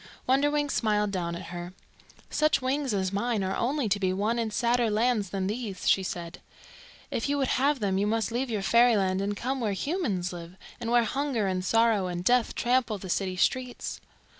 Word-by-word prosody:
Wonderwings 290 +2 +2
smiled 210 -2 +1
down 170 -3 -2
at 170 0 -8
her. 175 +1 -6 0.6
"Such 305 0 +2
wings 270 +1 -1
as 190 -2 -1
mine 215 0 0
are 190 +1 -1
only 265 +1 0
to 200 +1 +1
be 190 -2 +1
won 210 +5 0
in 225 -1 -1
sadder 235 +1 +1
lands 215 -2 +1
than 190 -1 -2
these," 205 -2 -4
she 195 - +4
said. 175 -2 -6 0.7
"If 230 - -1
you 285 - +1
would 270 -2 0
have 285 0 +2
them 195 -2 +1
you 205 - +1
must 225 +1 0
leave 250 +3 -1
your 210 -4 -2
fairyland 205 -5 +3
and 205 +1 -2
come 265 +5 -2
where 210 -3 0
humans 200 - -2
live, 170 0 -9 0.2
and 230 - -4
where 240 0 +4
hunger 265 -2 -1
and 185 -1 -1
sorrow 225 -2 +3
and 175 -1 -4
death 245 +3 +2
trample 240 -3 +1
the 190 -1 -9
city 185 +1 -1
streets." 250 +5 -1
215 Hz, 195 wpm, -28 LUFS, 190-250 Hz, 0.7 s, she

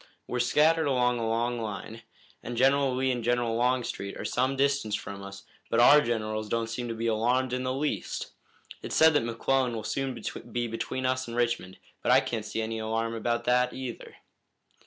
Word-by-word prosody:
We're 125 - -3
scattered 155 +6 +3
along 125 -2 +2
a 115 - -1
long 120 +1 0
line, 110 +1 -6 0.4
and 120 0 -6
General 135 +1 +3
Lee 130 0 +1
and 120 -2 -2
General 120 -1 +1
Longstreet 120 -4 -1
are - - -6
some 130 +2 0
distance 140 -6 +1
from 100 -1 -6
us, 100 0 -9 0.3
but 115 - +2
our 145 +5 +8
generals 110 -4 -2
don't 115 0 -1
seem 120 +1 -3
to 115 - -4
be 115 +1 -3
alarmed 120 +3 +1
in 125 - -1
the 130 0 -1
least. 145 +3 -3 0.5
It's - - -4
said 160 0 +6
that 145 - +3
McClellan 120 +2 0
will 110 - -4
soon 135 +1 -3 0.3
be 120 0 -1
between 120 +3 -3
us 130 0 0
and 115 0 -6
Richmond, 120 -6 -1 0.2
but - - +1
I - - +7
can't 110 -3 -3
see 110 +1 -3
any 110 0 -3
alarm 115 +1 -1
about 120 +1 -1
that 125 +1 +2
either." 130 -3 -7
120 Hz, 195 wpm, -28 LUFS, 115-130 Hz, 0.5 s, our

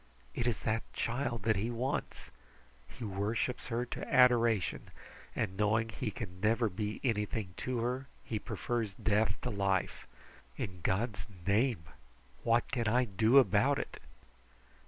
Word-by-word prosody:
It 120 - -1
is 115 -5 +1
that 110 +1 0
child 120 -2 -2
that 110 -1 +2
he 110 +4 -1
wants! 125 +4 -3 0.6
He 125 - -10
worships 105 +5 -1
her 120 +1 -1
to 120 - -6
adoration, 120 -6 +4 0.5
and 95 -4 -1
knowing 110 +2 +2
he 110 +1 -3
can 95 -3 -7
never 115 +2 +3
be 105 +3 -3
anything 105 -5 -1
to 125 -2 -2
her, 125 +3 -2 0.2
he 110 - -3
prefers 110 -2 -2
death 110 +2 +1
to 125 - -1
life. 100 -2 0 0.5
In 90 -4 -5
God's 105 +5 -1 0.2
name, 105 -1 +2 0.6
what 115 +1 +2
can 120 -4 0
I 125 +3 +3
do 110 +5 +4
about 125 -9 +5
it?" - - -5
110 Hz, 140 wpm, -33 LUFS, 105-120 Hz, 0.6 s, about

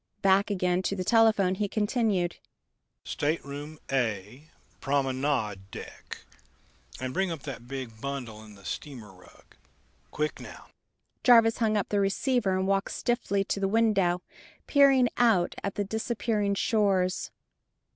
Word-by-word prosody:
Back 195 +1 +4
again 180 -2 +1
to 195 - -1
the 185 - -3
telephone 215 -3 +4
he 205 +2 -1
continued: 205 -4 0 0.7
"Stateroom 145 0 -3
A, 120 +3 -2 0.3
Promenade 130 -8 -1
deck.... - - -10 0.7
And 130 0 -4
bring 190 0 0
up 165 -4 -5
that 120 -4 -7
big 125 -4 -7
bundle 125 -6 -5
in 105 -1 -14
the 100 -1 -17
steamer 120 -9 -7
rug. 90 -1 -20 0.5
Quick 150 0 -2
now." - - -12 0.5
Jarvis 230 -2 +6
hung 215 -2 +2
up 200 - -1
the 205 - +1
receiver 200 0 +1
and 190 - 0
walked 195 0 0
stiffly 215 -5 0
to 200 - -2
the 195 - +1
window, 195 -5 +2 0.4
peering 275 -3 +5
out 220 -8 +3
at 200 - -3
the 205 - 0
disappearing 215 -1 -1
shores. 195 -4 +1
185 Hz, 135 wpm, -28 LUFS, 140-210 Hz, 0.7 s, Jarvis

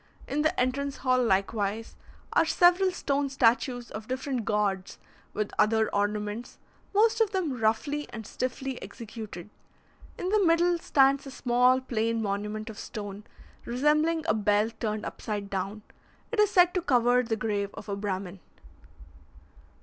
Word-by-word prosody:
In 290 +2 -1
the 310 +4 +1
entrance 275 +2 -1
hall, 255 -1 +2
likewise, 205 +1 0 0.4
are - - +5
several 360 +1 +4
stone 285 -5 -1
statues 245 -1 +1
of 215 0 -7
different 255 -2 -3
gods, 200 -3 -1 0.3
with 210 -1 -3
other 220 +1 +3
ornaments, 210 +3 -2 0.3
most 445 +2 +3
of 445 - +4
them 370 -8 -1
roughly 285 +7 0
and 220 -2 -8
stiffly 255 +2 -4
executed. 215 -5 -9 0.7
In 360 - -3
the 420 0 +3
middle 345 0 +3
stands 275 -2 +3
a - - -6
small 250 0 +3
plain 230 -2 -1
monument 210 +1 -3
of 215 - -11
stone, 205 -1 -7 0.4
resembling 305 +6 +1
a - - +2
bell 210 +1 +2
turned 215 -2 -2
upside 205 -2 -5
down; 200 +2 -3 0.5
it 460 - -2
is 420 -1 +5
said 360 -3 +5
to 365 - 0
cover 245 -5 +3
the 230 -2 -2
grave 205 -2 -2
of - - -9
a 200 - -2
Brahmin. 195 -2 -4
240 Hz, 145 wpm, -28 LUFS, 210-285 Hz, 0.7 s, are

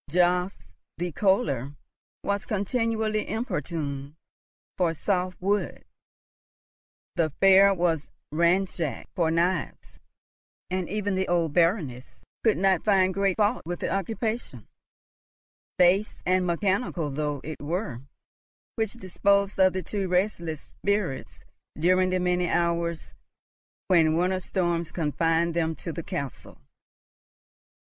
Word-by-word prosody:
Jobst 180 +3 +1 0.2
the 175 0 -2
Kohler 155 - +1 0.5
was 200 0 -2
continually 220 0 -1
importuned 150 - -3 0.6
for 175 -3 +1
soft 185 +1 -1
wood; 200 +2 -1 1.3
the 160 -2 +2
fair 195 +1 +7
was 165 -4 0 0.2
ransacked 170 -4 0
for 170 -4 +1
knives; 170 0 -1 0.7
and 185 -2 -2
even 205 +1 -1
the 190 0 0
old 170 -4 +1
Baroness 165 - 0 0.2
could 220 -2 +3
not 190 -2 +2
find 190 -3 +3
great 195 -1 +1
fault 215 +3 +2
with 175 +1 -4
the - - -1
occupation, 205 - -3 1.1
base 185 +4 +3
and 185 0 +2
mechanical 180 - 0
though 145 0 -2
it 155 0 -7
were, 145 - -3 0.8
which 220 -2 -1
disposed 200 -1 +1
of 185 -1 +5
the 185 -1 -3
two 195 +2 -3
restless 180 -4 -1 0.2
spirits 200 -9 -2 0.3
during 185 +3 +3
the 185 0 +1
many 180 -1 +1
hours 170 -1 -1 0.7
when 160 -4 +4
winter 185 +2 +1
storms 175 -3 -1
confined 165 +1 +1
them 160 -1 0
to 170 - -6
the 170 - -4
castle. 140 -4 -6
180 Hz, 115 wpm, -26 LUFS, 165-195 Hz, 1.3 s, fair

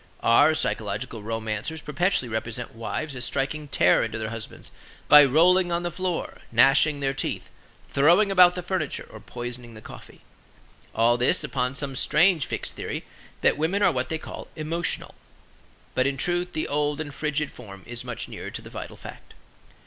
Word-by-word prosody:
Our 145 +7 +5
psychological 110 -2 -3
romancers 110 +7 -4
perpetually 160 -1 0
represent 110 0 -4
wives 130 +6 -4
as 125 - -3
striking 145 +3 -1
terror 90 -9 +3
into 115 -1 -3
their 110 0 -4
husbands 115 -1 -7 0.4
by 150 0 +10
rolling 175 +6 +4
on 170 +1 0
the 175 - -2
floor, 180 -1 -3
gnashing 135 +5 +4
their 135 -1 0
teeth, 135 - -4 0.4
throwing 175 +9 +4
about 180 -2 +6
the 180 - -4
furniture 175 -5 -3
or - - -10
poisoning 120 -1 -7
the - - -10
coffee; - - -13 0.7
all 115 +2 +4
this 125 +1 +1
upon 125 0 -2
some 140 -2 -2
strange 160 +2 +3
fixed - - -5
theory - - -5 0.4
that - - +3
women 185 +6 +1
are - - +5
what 130 0 -2
they 160 - -1
call - - -9
emotional. 165 +2 -3 0.8
But 130 +1 +2
in 140 -1 -2
truth 175 +4 -1
the 155 - -2
old 145 +1 -1
and 145 -2 -5
frigid 150 0 -2
form 100 -5 -12
is 120 +1 -7
much 125 -2 -6
nearer - - -7
to - - -7
the - - -11
vital - - -8
fact. - - -12
140 Hz, 170 wpm, -25 LUFS, 120-160 Hz, 0.8 s, by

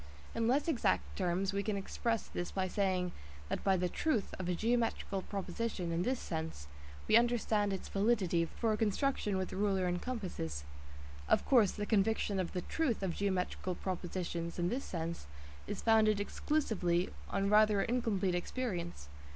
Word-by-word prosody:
In 230 0 0
less 275 +6 +2
exact 295 -8 +1
terms 185 +1 0
we 200 - +1
can 205 0 -1
express 225 +3 -1
this 175 - -4
by 190 -1 -1
saying 185 -2 0 0.4
that - - -2
by 190 -1 +4
the 180 0 +1
"truth" 225 - 0
of 185 -1 -2
a 180 - +1
geometrical 225 -2 0
proposition 195 -1 -3
in 165 +1 0
this 250 +6 0
sense 160 - -4 0.4
we - - +5
understand 225 -3 +2
its 190 - -4
validity 195 -5 +2
for 225 +6 -1
a - - 0
construction 215 -1 +1
with 190 0 -3
rule 200 0 +1
and 180 -1 0
compasses. 180 - -4 0.7
Of - - +4
course 230 -8 +5
the 210 - -3
conviction 205 -1 +2
of 185 - -2
the 180 - -1
"truth" 270 -11 0
of 185 -3 0
geometrical 185 -1 -1
propositions 175 -2 -3
in 175 0 +1
this 255 +6 -2
sense 170 - -4 0.4
is - - -4
founded 215 -2 +5
exclusively 205 - 0 0.2
on 195 +1 0
rather 210 -1 +5
incomplete 225 -6 +1
experience. 175 - -3
195 Hz, 160 wpm, -34 LUFS, 180-225 Hz, 0.7 s, we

